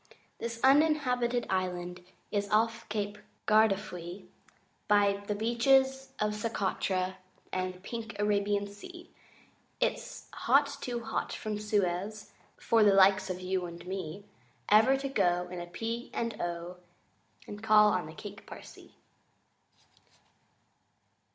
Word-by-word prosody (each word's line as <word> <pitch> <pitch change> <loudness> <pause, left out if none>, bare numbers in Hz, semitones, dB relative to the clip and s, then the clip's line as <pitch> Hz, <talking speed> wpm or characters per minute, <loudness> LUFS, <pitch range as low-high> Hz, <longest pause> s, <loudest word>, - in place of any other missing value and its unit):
THIS 230 0 -4
Uninhabited 265 -4 +3
Island 180 -1 -2 0.3
Is 205 -1 -1
off 225 +2 +1
Cape 210 -1 -3 0.3
Gardafui, 195 -4 +1 0.6
By 200 -1 +3
the 210 - -1
Beaches 265 +4 +2
of 210 0 0
Socotra 190 -4 -1 0.4
And 185 0 -2
the - - -15
Pink 230 +2 -6
Arabian 205 0 +1
Sea: 340 - -11 0.7
But - - +3
it's - - -10
hot 285 0 +2
too 240 -1 -3
hot - - -2
from 215 -1 -4
Suez 205 0 -1 0.3
For 225 -1 +3
the 205 -2 +5
likes 195 0 +5
of 185 0 -4
you 185 -1 -1
and 170 0 -10
me 190 +1 -5 0.4
Ever 225 +6 +6
to 275 +1 -3
go 180 -9 +1
In 180 -1 -6
a 175 - -7
P. 230 +6 -4
and 230 -2 -2
O. 175 +1 -4 0.7
And 205 0 -8
call 215 -1 +6
on 180 -4 -1
the 155 - -10
Cake - - -10
Parsee! - - -12
210 Hz, 125 wpm, -30 LUFS, 185-230 Hz, 0.7 s, Ever